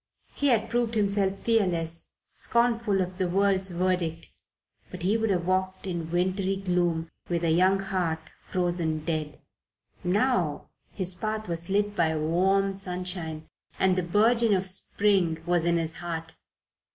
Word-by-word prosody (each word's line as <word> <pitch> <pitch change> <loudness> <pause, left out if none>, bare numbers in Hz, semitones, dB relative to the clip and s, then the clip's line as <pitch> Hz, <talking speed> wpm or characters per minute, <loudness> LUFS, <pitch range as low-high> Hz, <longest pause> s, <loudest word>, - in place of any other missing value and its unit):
He 285 - 0
had 225 -4 +3
proved 235 0 0
himself 200 -2 +1
fearless, 170 -7 0 0.3
scornful 235 -4 +1
of 185 +1 -4
the 185 -2 +1
world's 195 0 +2
verdict. 175 -2 -1 0.6
But - - -8
he 195 +4 +2
would 225 -1 +1
have 180 -3 +1
walked 185 +1 -1
in 170 -3 -3
wintry 185 +3 0
gloom 175 -4 0 0.2
with 170 -1 -1
a 165 - +2
young 185 +4 +4
heart 185 -4 -1 0.3
frozen 175 -4 -1
dead. 155 -3 -3 0.6
Now 185 - 0 0.2
his 185 -2 -2
path 215 +3 -3
was 170 +1 -2
lit 205 +1 +1
by 160 -3 +2
warm 190 +5 +2
sunshine 180 -4 -3 0.3
and 190 -1 +3
the 185 - +1
burgeon 220 +5 +3
of 190 0 -1
spring 185 -3 0
was 175 -1 +1
in 170 0 +3
his 165 -1 -2
heart. 165 -2 -5
185 Hz, 145 wpm, -27 LUFS, 170-200 Hz, 0.6 s, young